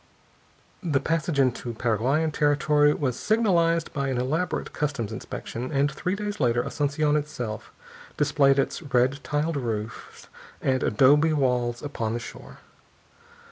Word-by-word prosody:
The 155 Hz, -8 st, +1 dB
passage 165 Hz, 0 st, -1 dB
into 125 Hz, -2 st, +1 dB
Paraguayan 125 Hz, +8 st, +1 dB
territory 150 Hz, 0 st, +3 dB
was 130 Hz, -5 st, -2 dB
signalized 170 Hz, -7 st, +2 dB
by 140 Hz, -2 st, -1 dB
an 130 Hz, -2 st, -1 dB
elaborate 155 Hz, +9 st, -2 dB
customs 140 Hz, -8 st, -2 dB
inspection, 115 Hz, +3 st, -6 dB
and 145 Hz, 0 st, +2 dB
three 180 Hz, +7 st, -2 dB
days 205 Hz, 0 st, -4 dB
later 120 Hz, -2 st, +2 dB
Asunción 145 Hz, +2 st, 0 dB
itself 135 Hz, -8 st, -4 dB, 0.5 s
displayed 140 Hz, -2 st, +3 dB
its 135 Hz, -, 0 dB
red 135 Hz, -2 st, +1 dB
tiled 150 Hz, +2 st, -1 dB
roofs 110 Hz, -4 st, -5 dB, 0.3 s
and 130 Hz, -1 st, 0 dB
adobe 145 Hz, +8 st, +4 dB
walls 125 Hz, -4 st, 0 dB
upon 115 Hz, -6 st, -3 dB
the 120 Hz, -, -2 dB
shore. 120 Hz, -, -10 dB
140 Hz, 130 wpm, -25 LUFS, 125-150 Hz, 0.5 s, adobe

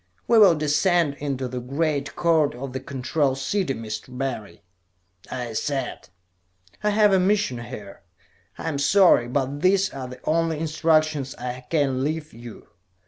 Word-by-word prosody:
"We 230 Hz, -1 st, +5 dB
will 195 Hz, -6 st, +7 dB
descend 150 Hz, +1 st, +2 dB
into 135 Hz, -3 st, -3 dB
the 125 Hz, 0 st, -5 dB
Great 140 Hz, +3 st, -2 dB
Court 160 Hz, -5 st, +2 dB
of 130 Hz, +1 st, -7 dB
the 130 Hz, -, -3 dB
Control 135 Hz, +1 st, -1 dB
City, 135 Hz, +2 st, -1 dB
Mr. 110 Hz, +3 st, -7 dB
Barry," 110 Hz, -6 st, -5 dB, 0.7 s
I 125 Hz, -3 st, -5 dB
said. 135 Hz, +2 st, -3 dB, 0.7 s
"I 210 Hz, -, +3 dB
have 210 Hz, -1 st, +4 dB
a 190 Hz, -, +5 dB
mission 190 Hz, -, +1 dB
here. 120 Hz, -5 st, -9 dB, 0.6 s
I -, -, -6 dB
am 145 Hz, -3 st, -2 dB
sorry, 160 Hz, -5 st, +5 dB
but 135 Hz, +3 st, -2 dB
these 195 Hz, +1 st, +3 dB
are 130 Hz, -2 st, -6 dB
the 125 Hz, 0 st, -10 dB
only 165 Hz, 0 st, +1 dB
instructions 155 Hz, -3 st, +1 dB
I 125 Hz, 0 st, -6 dB
can 135 Hz, -5 st, +1 dB
leave 155 Hz, +1 st, -3 dB
you. 120 Hz, 0 st, -12 dB
140 Hz, 150 wpm, -24 LUFS, 125-165 Hz, 0.7 s, will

